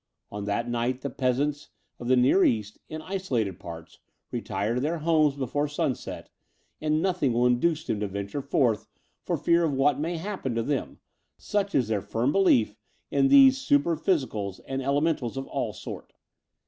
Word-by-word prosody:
On 105 0 -5
that 105 +4 -1
night 120 +2 -1
the 140 - -4
peasants 140 +3 -1 0.3
of 120 - -6
the 130 - +5
Near 130 +10 +4
East, 105 -2 0
in 155 0 -6
isolated 125 - -2
parts, 85 -2 -10 0.3
retire 105 +3 -2
to 125 - -1
their 160 +5 -1
homes 155 -3 +2
before 145 +2 -1
sunset, 140 -3 -3 0.5
and 155 +1 +1
nothing 180 -9 +1
will 120 +1 +2
induce 145 +6 +2
them 105 - -2
to 105 - -1
vaiture 100 +7 -4
forth 130 -5 +1 0.3
for - - -2
fear 170 0 +3
of 155 -3 +1
what 140 +1 +2
may 165 +3 -2
happen 165 - -4
to 115 - 0
them, 140 +1 -2 0.4
such 200 -1 -2
is 125 -5 +2
their 105 -3 0
firm 115 +6 0
belief 120 - +3 0.4
in 135 -1 +3
these 270 - +7
super 280 -11 +2
phy 175 +5 +2
sicals 105 - -3
and 135 0 -2
elementals 140 -2 0
of 135 - -3
all - - -3
sorts. - - -9
135 Hz, 175 wpm, -27 LUFS, 115-160 Hz, 0.5 s, these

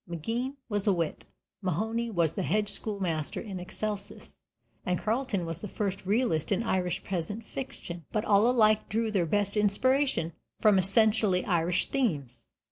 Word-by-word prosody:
Maginn 230 - -3
was 205 -2 -2
a 200 - +5
wit, 165 -3 -3 0.3
Mahony 220 +6 -1
was 170 -7 +1
the - - -2
hedge 210 +3 0
schoolmaster 185 -9 -2
in 195 -5 -6
excelsis, 205 +3 -5 0.5
and 180 0 0
Carleton 220 -4 -1
was 165 0 -4
the 210 - -4
first 195 -2 -3
realist 205 - +1
in 205 +3 +1
Irish 185 -5 -1
peasant 195 +5 -4
fiction. 175 - -6
But 215 - -1
all 210 +3 +4
alike 215 -3 +3
drew 225 +1 0
their 185 -5 +1
best 205 +4 +2
inspiration 210 - +2 0.3
from 210 -3 +5
essentially 205 -1 +4
Irish 175 0 +1
themes. 145 - -2
200 Hz, 150 wpm, -29 LUFS, 175-220 Hz, 0.5 s, a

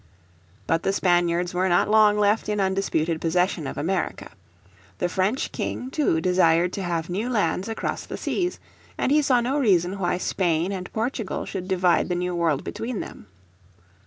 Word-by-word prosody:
But 165 0 +1
the 195 - +1
Spaniards 175 -1 +1
were 185 +1 +1
not 175 - +3
long 210 -1 +5
left 210 +1 +2
in 210 -1 0
undisputed 190 -4 0
possession 170 -2 0
of - - -6
America. 170 +3 -2 0.7
The 180 - 0
French 190 +8 -1
King 255 +1 -4
too 275 - +1
desired 175 0 +3
to 200 - -3
have 170 -3 -2
new 205 +7 -2
lands 210 -3 0
across 225 - -3
the - - -5
seas, 360 -1 -2 0.4
and - - 0
he 300 +1 +5
saw 255 -4 +3
no 265 +5 0
reason 190 -5 +2
why 180 -1 0
Spain 175 -1 0
and 185 -2 -5
Portugal 225 -2 -3
should 185 -2 -5
divide 180 -2 +2
the 180 - 0
New 180 0 -2
World 165 -5 0
between 230 -2 -4
them. - - -8
185 Hz, 170 wpm, -24 LUFS, 175-210 Hz, 0.7 s, long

